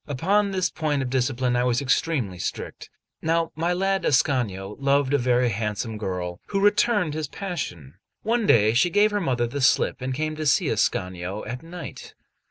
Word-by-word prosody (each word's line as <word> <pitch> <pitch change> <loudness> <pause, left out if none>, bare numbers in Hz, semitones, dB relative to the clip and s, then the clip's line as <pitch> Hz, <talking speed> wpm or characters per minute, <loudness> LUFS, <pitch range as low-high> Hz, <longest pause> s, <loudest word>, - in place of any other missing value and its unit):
Upon 195 +9 +1
this 190 -2 0
point 150 -4 -1
of 125 - -4
discipline 130 -1 0
I 120 - +2
was 125 -1 +1
extremely 125 - 0
strict. - - -5 0.3
Now 165 0 0
may 165 +3 0
lad 195 +2 0
Ascanio 110 -8 0
loved 140 0 +2
a 145 - +4
very 125 0 +2
handsome 110 +1 -3
girl, 90 -3 -4
who 200 - -1
returned 205 -4 +2
his 155 -1 -3
passion. 130 - -6 0.3
One 230 -1 +1
day 110 -1 +5
she 175 +10 +3
gave 205 +3 +3
her 205 0 0
mother 125 -7 0
the 140 +4 -4
slip, 135 0 +2
and 130 +1 -2
came 155 +3 -2
to 155 -1 -2
see 140 - +3
Ascanio 90 +2 -1
at 125 +4 -5
night. 170 +1 -9
135 Hz, 180 wpm, -24 LUFS, 115-170 Hz, 0.3 s, day